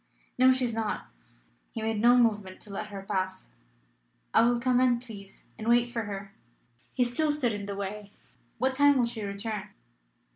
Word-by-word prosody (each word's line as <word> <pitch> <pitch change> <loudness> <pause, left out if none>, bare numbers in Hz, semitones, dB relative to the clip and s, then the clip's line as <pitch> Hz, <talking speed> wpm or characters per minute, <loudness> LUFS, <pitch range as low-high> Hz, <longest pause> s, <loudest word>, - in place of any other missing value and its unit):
"No; 260 0 +7
she 260 0 +1
is 235 -2 0
not." 220 -1 -3 0.6
He 225 - -4
made 220 -1 -1
no 240 +2 +6
movement 210 -6 +1
to 205 - -9
let 210 +2 -4
her 200 -2 -8
pass. 190 - -3 0.8
"I - - +6
will 240 +1 +3
come 250 0 +2
in, 250 -2 +4
please, 205 -5 -12
and 220 - -5
wait 240 0 +4
for 230 -2 -3
her." 200 -1 -7 0.6
He 250 - +3
still 270 +6 +1
stood 265 -6 0
in 205 -1 -5
the 200 - -4
way. 200 +1 -5 0.5
"What 260 +3 +1
time 285 +1 +5
will 245 - +3
she 235 -1 -5
return?" 200 +1 -4
225 Hz, 185 wpm, -28 LUFS, 200-245 Hz, 0.8 s, No